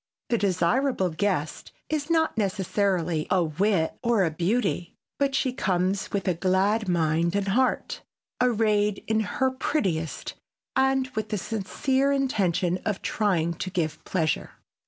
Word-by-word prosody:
The 235 - +2
desirable 190 +2 +1
guest 160 -3 -2 0.2
is 305 0 -2
not 325 -1 +2
necessarily 190 -5 0
a 185 -3 +3
wit 165 +1 0
or 235 -4 +2
a 165 - +1
beauty 180 +1 -1 0.2
but 275 -1 +1
she 260 -2 +1
comes 190 -3 0
with 200 -2 -2
a 180 - +3
glad 190 +4 +1
mind 170 +1 +1
and 200 -1 0
heart, 255 +6 0 0.4
arrayed 210 -4 +2
in 220 0 +1
her 260 +5 0
prettiest 185 - -2 0.4
and 265 0 +2
with 220 -4 -4
the 210 - -1
sincere 260 +8 0
intention 185 -10 +1
of 210 -3 -2
trying 175 -6 +1
to 185 - -5
give 165 -5 -2
pleasure. 160 -5 -1
200 Hz, 135 wpm, -26 LUFS, 175-235 Hz, 0.4 s, a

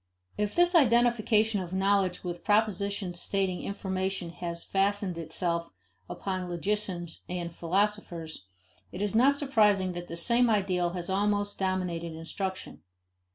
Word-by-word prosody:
If 210 0 -2
this 350 +1 +4
identification 235 - +4
of 180 0 -7
knowledge 190 -1 +1
with 175 -1 -5
propositions 200 -4 0
stating 190 -2 -1
information 190 -2 -3
has 170 0 -5
fastened 195 -1 0
itself 170 +1 -2 0.4
upon 185 -2 -3
logicians 175 -2 -2
and 175 -1 -4
philosophers, 170 - -1 0.4
it 185 - -4
is 205 - -1
not 265 +5 +5
surprising 210 -9 +3
that 175 0 -6
the 170 - -6
same 235 +7 +3
ideal 185 -5 +1
has 175 -2 -4
almost 205 +1 0
dominated 180 -3 -1
instruction. 185 +4 -5
190 Hz, 125 wpm, -29 LUFS, 175-210 Hz, 0.4 s, not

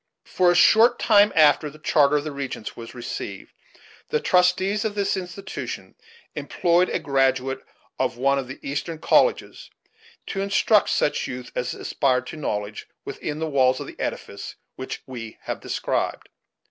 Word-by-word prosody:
For 180 -1 +2
a - - +1
short 225 +7 +6
time 205 -1 +5
after 150 -1 +5
the 150 - -14
charter 150 -1 +3
of 145 - -2
the 155 - -4
regents 140 -5 -5
was 115 +1 -10
received, 100 -5 -6 0.6
the 150 - +1
trustees 185 +4 +2
of 215 -2 -2
this 200 -1 0
institution 190 +1 -6 0.4
employed 175 +1 +1
a - - 0
graduate 135 -1 +1 0.4
of 130 -2 0
one 140 +2 +2
of 130 - -5
the 130 - -8
Eastern 145 +4 -3
colleges 485 - +1 0.6
to 195 - -3
instruct 200 +1 +3
such 145 - 0
youth 125 -1 -7
as 125 - -3
aspired 130 -2 0
to - - -8
knowledge 105 -8 -4 0.2
within 150 - -5
the 160 - -2
walls 130 -3 +3
of - - -5
the - - -12
edifice - - -5 0.2
which 130 - -6
we 115 -4 -8
have - - -4
described. - - -2
145 Hz, 160 wpm, -24 LUFS, 130-180 Hz, 0.6 s, short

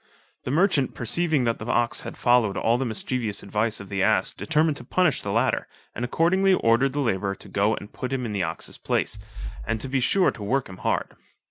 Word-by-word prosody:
The - - -3
merchant 150 -3 +2
perceiving 155 +3 +1
that 115 -1 0
the 105 - -7
ox 120 -1 +1
had - - -8
followed 120 -5 +3
all 115 +2 +2
the 135 - -1
mischievous 110 -1 -2
advice 105 +2 -1
of 100 - -9
the 95 0 -2
ass, - - +3
determined 155 -1 +1
to - - -8
punish 175 +4 +1
the 100 - -3
latter, 115 +5 +1 0.3
and 120 - -4
accordingly 185 +9 +3
ordered 130 0 +2
the 145 - 0
labourer 100 -5 0
to - - -14
go 100 +3 +1
and 105 - -10
put 125 - -5
him 130 -2 -1
in 110 - -4
the 100 - -1
ox's 80 -1 -4
place, - - -1 0.4
and 110 - -2
to 135 - -5
he 135 0 +1
sure 185 +9 +3
to - - -12
work 125 +6 0
him 95 - -10
hard. - - -2
120 Hz, 220 wpm, -25 LUFS, 105-140 Hz, 0.4 s, followed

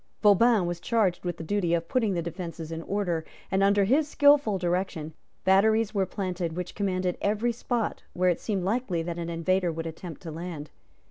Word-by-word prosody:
Vauban 210 0 +5
was 175 0 -3
charged 195 -2 +1
with 175 -2 -3
the - - -6
duty 175 -1 +1
of 165 0 -3
putting 220 -5 +1
the 170 - -1
defences 170 -2 -6
in 165 0 -4
order; 175 -3 -1 0.3
and, 190 - +2
under 200 0 +4
his 280 +9 +3
skilful 285 -8 +4
direction, 175 -3 -2 0.3
batteries 215 +3 +4
were 195 -3 +1
planted 180 -3 -3
which 180 0 -4
commanded 185 -3 -1
every 215 +4 +1
spot 235 -1 -2
where 180 +1 +2
it 175 - -2
seemed 200 -4 -2
likely 195 -4 -1
that 170 0 -4
an 170 0 -4
invader 175 +2 +1
would 165 0 -5
attempt 165 0 -7
to 165 - -7
land. 160 -2 -6
185 Hz, 190 wpm, -27 LUFS, 170-205 Hz, 0.3 s, Vauban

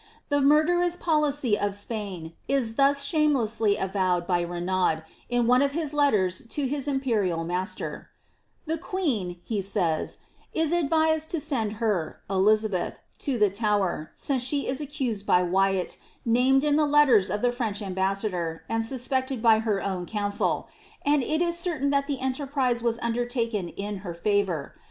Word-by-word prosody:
The 285 -1 +2
murderous 340 +5 +3
policy 295 -8 +1
of 205 -1 -1
Spain 200 -6 -5
is 260 -4 +1
thus 280 +3 +3
shamelessly 245 -9 +2
avowed 185 -2 0
by 175 -2 +1
Renaud 175 -1 0 0.3
in 245 -1 +1
one 250 +2 +4
of 280 0 +1
his 305 -2 -2
letters 215 -10 +1
to 285 +4 -2
his 280 +1 -2
imperial 220 -12 0
master: 180 +3 -4 0.3
— - - -42
^The 325 +1 -2
queen,^' 255 - -2
he 215 -3 -2
says,* 185 -5 -1
^^ - - -27 0.3
is 320 -1 +1
advised 315 -1 +2
to 335 - -1
send 255 -9 -1
her 210 -7 -1
(Elizabeth) 205 0 +2 0.2
to 275 -4 -1
the 210 -3 +3
Tower, 200 -6 0
since 270 -3 -1
she 280 +3 +1
is 265 +3 -2
accused 260 -8 -3
by 180 - +4
Wyat, 190 +1 +1 0.3
named 255 +4 +3
in 295 -1 +3
the 305 -1 +3
letters 285 -9 +5
of 210 - -2
the 245 - +3
French 230 -5 -2
ambassador, 190 -4 -2
and 225 0 0
suspected 260 +1 -1
by 225 -1 +5
her 215 -3 -1
own 185 -3 -3
council; 205 -2 -1 0.4
and 290 0 +3
it 310 +6 0
is 340 0 0
certain 310 -6 0
that 280 0 +1
the 280 -3 -2
enterprise 265 -2 0
was 230 -1 0
undertaken 235 -5 -1
in 205 +2 -5
her 180 -3 -7
favour. 190 -5 0
230 Hz, 160 wpm, -26 LUFS, 195-280 Hz, 0.4 s, letters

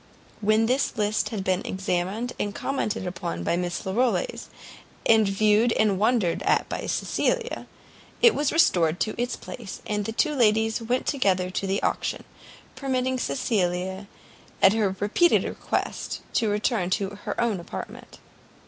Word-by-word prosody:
When 215 +1 +3
this 255 +1 0
list 210 0 0
had 210 -5 -4
been 185 0 0
examined 190 +5 -2
and 205 0 -2
commented 230 -7 -2
upon 170 - -4
by 170 - +1
Miss 175 0 -3
Larolles, 245 - 0 0.6
and 220 -2 +5
viewed 215 +3 +3
and 205 -3 +2
wondered 215 -6 +2
at - - +2
by - - -4
Cecilia, - - -1 0.5
it 470 - +6
was 290 -1 0
restored 175 - +3
to 215 - 0
its 245 - -1
place, 220 -6 -8
the 210 0 -2
two 300 +7 +1
ladies 220 -3 +2
went 245 +3 -1
together 185 -9 +1
to 195 - -2
the 195 +1 -1
auction, - - -1 0.5
permitting 260 -1 -1
Cecilia, 190 - -1 0.5
at 195 - +6
her 205 -4 +1
repeated 285 +12 +3
request, - - -3
to 225 -3 +2
return 210 -2 0
to 195 0 0
her - - -3
own 225 -5 +1
apartment. 170 - -8
210 Hz, 145 wpm, -25 LUFS, 190-240 Hz, 0.6 s, it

